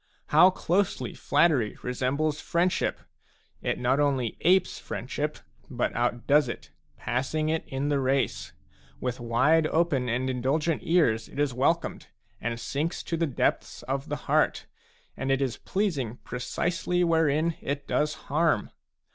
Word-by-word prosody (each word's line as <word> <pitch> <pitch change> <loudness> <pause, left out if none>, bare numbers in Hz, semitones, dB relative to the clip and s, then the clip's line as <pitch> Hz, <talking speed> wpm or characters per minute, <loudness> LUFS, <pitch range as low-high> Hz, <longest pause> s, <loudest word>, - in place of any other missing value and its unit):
How 185 - +7
closely 180 - -1
flattery 145 -7 +2
resembles 140 +5 -1
friendship! 175 +2 0 0.6
It - - -1
not 130 +3 +1
only 135 -6 +1
apes 185 +1 +3
friendship, 145 +5 -4 0.3
but 120 -3 -1
outdoes 120 +5 +2
it, - - -7 0.3
passing 135 +6 -1
it 160 0 0
in 135 +2 -2
the 145 -1 +2
race; 135 0 0 0.5
with 125 0 -3
wide 130 +7 +3
open 155 -7 +1
and 125 +2 0
indulgent 135 +6 0
ears 140 -11 +2
it - - -12
is 145 -3 +1
welcomed 150 +7 0 0.3
and 115 0 -3
sinks 145 +8 -2
to 165 - -2
the 165 0 0
depths 130 - -1
of 135 +4 -3
the 145 - -1
heart, - - +2 0.5
and 135 - -3
it 135 - +2
is 130 -4 -1
pleasing 145 - -2
precisely 175 +7 -1
wherein 160 -1 +2
it 140 0 -4
does 150 +1 0
harm. 155 -6 +1
140 Hz, 140 wpm, -27 LUFS, 125-160 Hz, 0.6 s, How